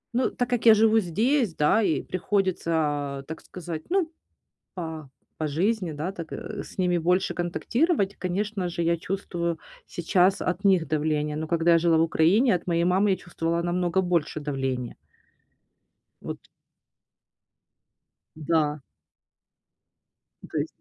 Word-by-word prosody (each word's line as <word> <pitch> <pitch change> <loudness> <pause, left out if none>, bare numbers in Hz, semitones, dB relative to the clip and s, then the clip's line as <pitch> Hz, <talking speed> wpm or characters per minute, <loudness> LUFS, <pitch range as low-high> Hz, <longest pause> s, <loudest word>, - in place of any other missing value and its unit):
Ну, 250 - +2
так 245 - -2
как 245 -2 -1
я 220 - +10
живу 220 +1 +4
здесь, 215 - +1
да, 150 +9 +3
и 160 -8 +1
приходится, 185 -1 -1
а, 145 -3 -1
так 160 - -7
сказать, 170 -3 -7
ну, 355 -3 +1 0.6
по 160 -5 -6 0.3
по 155 - -1
жизни, 180 +3 0
да, 155 +6 -3
так, 165 -4 -8
э, 210 -1 -6
с - - -14
ними 180 -1 +2
больше 180 +3 +1
контактировать, 200 - 0
конечно 190 +1 -2
же, 170 0 -3
я 170 0 +2
чувствую 170 -2 -3 0.3
сейчас 180 +3 +2
от 180 +3 -2
них 185 -4 +4
давление. 150 0 0
Но 160 - -3
когда 170 +1 +2
я - - +6
жила 165 -1 +3
в 160 - +4
Украине, 175 +9 +3
от 175 - -5
моей 170 0 +1
мамы 190 +3 +3
я - - +3
чувствовала 170 -1 -2
намного 175 +1 0
больше 170 -4 -1
давление. 135 -4 -3 1.3
Вот. - - -5 2.0
Да. 150 -1 0 1.7
То - - -3
есть. - - -1
175 Hz, 140 wpm, -26 LUFS, 160-195 Hz, 2.0 s, я